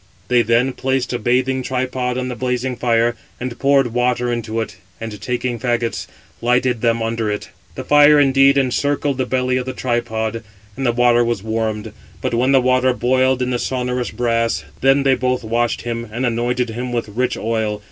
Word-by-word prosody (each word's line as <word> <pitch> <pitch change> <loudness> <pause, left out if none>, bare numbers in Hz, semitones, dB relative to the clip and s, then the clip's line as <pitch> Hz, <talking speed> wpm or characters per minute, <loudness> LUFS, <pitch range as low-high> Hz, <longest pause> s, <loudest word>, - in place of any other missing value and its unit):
They 125 -1 +4
then 120 +3 +2
placed 130 0 -1
a 120 - -1
bathing 130 +3 +1
tripod 125 -1 -2
on 130 0 -2
the 125 - -4
blazing 125 +1 -2
fire, 120 0 +1 0.2
and 125 -1 -5
poured 135 -4 +3
water 125 0 +1
into 115 -1 -3
it, 105 -3 -5 0.2
and 110 -2 -7
taking 125 -1 -2
fagots, 120 -1 -1 0.3
lighted 125 -1 +1
them 115 -1 +1
under 115 -1 -1
it. 105 - -4 0.3
The - - -5
fire 145 0 +6
indeed 135 0 +5
encircled 140 +1 0
the 130 - 0
belly 130 0 0
of 130 0 -3
the 130 - -3
tripod, 115 -3 -2 0.3
and 135 +2 -2
the - - +4
water 120 0 +3
was 115 -4 -2
warmed. 110 -1 -2 0.3
But - - -2
when 125 +3 +2
the 135 - +6
water 130 0 +3
boiled 130 +1 +2
in 125 - -2
the 120 - -1
sonorous 125 -1 -2
brass, 115 -1 0 0.2
then 135 +1 +3
they 135 -1 +4
both 125 0 0
washed 115 +1 -1
him, 115 -1 -4
and 120 +4 -2
anointed 120 0 -1
him 125 +2 -4
with 120 -3 -2
rich 125 +5 -1
oil. 110 -2 -1
125 Hz, 190 wpm, -19 LUFS, 115-130 Hz, 0.3 s, fire